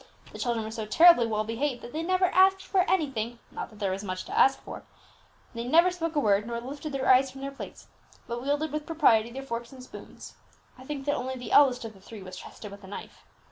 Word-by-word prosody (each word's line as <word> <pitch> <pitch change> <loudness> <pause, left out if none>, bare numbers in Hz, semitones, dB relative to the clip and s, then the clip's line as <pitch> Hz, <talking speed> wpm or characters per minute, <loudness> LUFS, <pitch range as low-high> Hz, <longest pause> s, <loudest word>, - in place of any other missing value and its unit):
The - - -10
children 235 -3 -1
were 220 - -6
so 220 -1 -5
terribly 320 0 +6
well 215 -1 -1
behaved, 240 +4 -3
that 240 - -9
they 315 - -2
never 370 +2 +2
asked 380 +1 +4
for 380 -1 +1
anything 245 - -1
(not - - -6
that 215 - -16
there 200 -2 -1
was 195 +2 -4
much 185 -2 -5
to - - -6
ask 270 0 +4
for), - - -8 0.7
they 235 0 -4
never 335 +9 +4
spoke 330 -2 -4
a - - +3
word, 210 -4 +2
nor 235 0 -3
lifted 285 +5 -7
their 265 -1 -2
eyes 260 +1 +5
from 270 +1 -11
their 275 0 -4
plates, 275 - -10 0.4
but 235 0 -5
wielded 290 +3 -1
with 305 0 -4
propriety 235 -9 +3
their 265 +3 -7
forks 235 -2 -5
and 260 -2 -11
spoons; - - -11 0.4
I 255 - -14
think 275 -1 -5
that 290 - +1
only 260 0 -3
the 250 -1 -8
eldest 255 -4 +5
of 220 - -7
the 195 - -18
three 210 0 -11
was 185 -1 -9
trusted 205 +2 -10
with 200 0 -12
a - - -11
knife. 200 - -10
255 Hz, 245 wpm, -27 LUFS, 225-295 Hz, 0.7 s, terribly